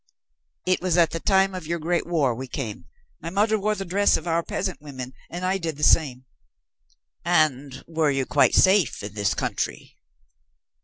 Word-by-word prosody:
"It 185 Hz, 0 st, +1 dB
was 180 Hz, -1 st, 0 dB
at 170 Hz, -2 st, +4 dB
the 165 Hz, -, -3 dB
time 195 Hz, +1 st, +2 dB
of 180 Hz, -4 st, -7 dB
your 170 Hz, +1 st, -1 dB
great 170 Hz, +2 st, -1 dB
war 150 Hz, -8 st, +1 dB
we 130 Hz, +3 st, -7 dB
came. 120 Hz, -5 st, -6 dB, 0.4 s
My 165 Hz, -, -5 dB
mother 210 Hz, +4 st, +1 dB
wore 210 Hz, +2 st, 0 dB
the 195 Hz, -, -5 dB
dress 200 Hz, +3 st, +2 dB
of 160 Hz, -, -9 dB
our 165 Hz, 0 st, +1 dB
peasant 185 Hz, 0 st, -4 dB
women, 130 Hz, -3 st, -8 dB, 0.2 s
and 175 Hz, +2 st, -5 dB
I 190 Hz, +1 st, 0 dB
did 160 Hz, -4 st, -4 dB
the 150 Hz, -, -6 dB
same." 130 Hz, -6 st, +3 dB, 1.0 s
"And 150 Hz, -6 st, +1 dB
were 160 Hz, -2 st, +1 dB
you 135 Hz, -2 st, 0 dB
quite 145 Hz, -, +3 dB
safe 190 Hz, -, +3 dB
in 100 Hz, 0 st, -7 dB
this 100 Hz, -2 st, 0 dB
country?" -, -, -4 dB
165 Hz, 185 wpm, -24 LUFS, 140-185 Hz, 1.0 s, at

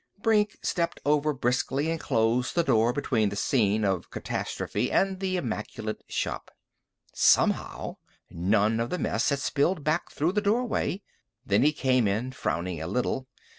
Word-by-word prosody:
Brink 210 Hz, -1 st, +2 dB
stepped 170 Hz, -1 st, -1 dB
over 150 Hz, +1 st, +2 dB
briskly 135 Hz, +3 st, 0 dB
and 165 Hz, -, -2 dB
closed 120 Hz, -1 st, +1 dB
the 170 Hz, -, +3 dB
door 115 Hz, -5 st, +3 dB
between 120 Hz, -5 st, 0 dB
the 100 Hz, -, -5 dB
scene 105 Hz, -1 st, +1 dB
of 95 Hz, -3 st, -1 dB
catastrophe 110 Hz, +5 st, -3 dB
and 190 Hz, -1 st, +1 dB
the 190 Hz, -1 st, -1 dB
immaculate 110 Hz, -5 st, -4 dB
shop. -, -, -3 dB, 0.6 s
Somehow, -, -, +2 dB, 0.3 s
none 105 Hz, +5 st, +2 dB
of 115 Hz, +1 st, -1 dB
the 180 Hz, -, -2 dB
mess -, -, 0 dB
had 140 Hz, -, +1 dB
spilled 145 Hz, +4 st, 0 dB
back 155 Hz, +2 st, 0 dB
through 160 Hz, +4 st, 0 dB
the 210 Hz, +2 st, 0 dB
doorway. 210 Hz, -2 st, 0 dB, 0.4 s
Then 100 Hz, +2 st, +3 dB
he 150 Hz, +3 st, +5 dB
came 130 Hz, -6 st, +2 dB
in, 110 Hz, +6 st, -1 dB
frowning 85 Hz, -8 st, -3 dB
a 80 Hz, -, -4 dB
little. 125 Hz, +5 st, -1 dB
130 Hz, 155 wpm, -27 LUFS, 110-165 Hz, 0.6 s, he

